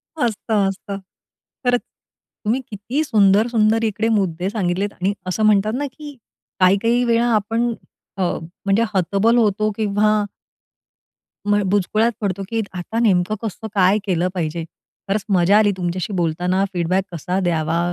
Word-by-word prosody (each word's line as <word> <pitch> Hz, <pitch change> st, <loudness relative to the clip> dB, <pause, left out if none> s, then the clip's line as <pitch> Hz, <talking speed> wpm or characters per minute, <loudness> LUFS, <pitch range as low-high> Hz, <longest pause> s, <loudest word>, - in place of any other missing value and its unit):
असतं, 220 Hz, -6 st, 0 dB
असतं. 195 Hz, +1 st, -6 dB, 0.7 s
खरंच 245 Hz, 0 st, +3 dB, 0.6 s
तुम्ही 240 Hz, +5 st, +1 dB
किती 225 Hz, +9 st, -2 dB
सुंदर, 210 Hz, -4 st, +4 dB
सुंदर 225 Hz, -1 st, +2 dB
इकडे 220 Hz, 0 st, 0 dB
मुद्दे 190 Hz, -4 st, 0 dB
सांगितलेत 200 Hz, -1 st, -1 dB
आणि 190 Hz, +3 st, -1 dB
असं 185 Hz, +4 st, -1 dB
म्हणतात 215 Hz, +1 st, +3 dB
ना, 290 Hz, -, -1 dB
की 295 Hz, +1 st, -10 dB, 0.4 s
काही-काही 205 Hz, +6 st, +3 dB
वेळा 235 Hz, 0 st, +2 dB
आपण 225 Hz, +3 st, 0 dB, 0.4 s
अ, 190 Hz, -, 0 dB, 0.4 s
म्हणजे 200 Hz, +3 st, +3 dB
हतबल 200 Hz, +5 st, +2 dB
होतो 215 Hz, -1 st, +2 dB
किंवा 210 Hz, 0 st, +2 dB, 1.2 s
म 205 Hz, 0 st, +3 dB
बुचकुळ्यातं 215 Hz, +4 st, +1 dB
पडतो 200 Hz, -2 st, -2 dB
की 225 Hz, -1 st, 0 dB
आता 185 Hz, +6 st, -4 dB
नेमकं 200 Hz, -3 st, +2 dB
कसं 220 Hz, 0 st, -5 dB
काय 195 Hz, +2 st, +4 dB
केलं 180 Hz, -2 st, +1 dB
पाहिजे? 165 Hz, -2 st, -2 dB, 0.4 s
खरंच 200 Hz, +1 st, 0 dB
मजा 190 Hz, +1 st, +4 dB
आली 210 Hz, -1 st, +4 dB
तुमच्याशी 180 Hz, +1 st, -3 dB
बोलताना 180 Hz, +3 st, 0 dB
फीडबॅक 185 Hz, +2 st, 0 dB
कसा 180 Hz, +3 st, -2 dB
द्यावा? 165 Hz, -2 st, 0 dB
205 Hz, 135 wpm, -20 LUFS, 185-225 Hz, 1.2 s, सुंदर